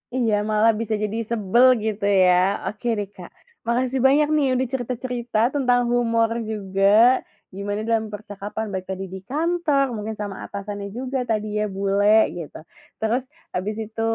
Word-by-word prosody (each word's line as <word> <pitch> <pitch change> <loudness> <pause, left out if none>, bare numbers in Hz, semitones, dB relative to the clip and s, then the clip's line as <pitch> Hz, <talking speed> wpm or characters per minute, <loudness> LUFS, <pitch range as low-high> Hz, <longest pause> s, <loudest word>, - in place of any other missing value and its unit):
Iya 235 -4 +1 0.2
malah 215 +2 +4
bisa 225 -1 -2
jadi 215 +2 -2
sebel 235 +3 +3 0.2
gitu 215 -1 -3 0.2
ya 180 - +5 0.4
oke 215 +3 -5
deh, 200 - -3
Kak, 180 -2 -11 0.4
makasih 255 +2 0
banyak 295 +2 +4
nih 290 -2 +3
udah 260 - 0
cerita-cerita 245 -2 -3 0.2
tentang 245 -3 +3
humor 230 -2 +2 0.2
juga, 195 -2 -3 0.7
gimana 205 +1 -3
dalam 225 -1 +1
percakapan 205 +1 -6
baik 185 0 -4
tadi 190 0 -4
di 190 - -5
kantor 310 -2 +1
mungkin 215 +1 -4
sama 205 -2 -4
atasannya 200 0 -6
juga 260 +1 -3
tadi 215 -1 0
ya 210 - +1
bule, 200 +2 +4
gitu. 165 -4 -7 0.4
Terus 235 +4 0 0.3
habis 200 +4 -2
itu, 225 +1 -6
220 Hz, 155 wpm, -23 LUFS, 205-245 Hz, 0.7 s, ya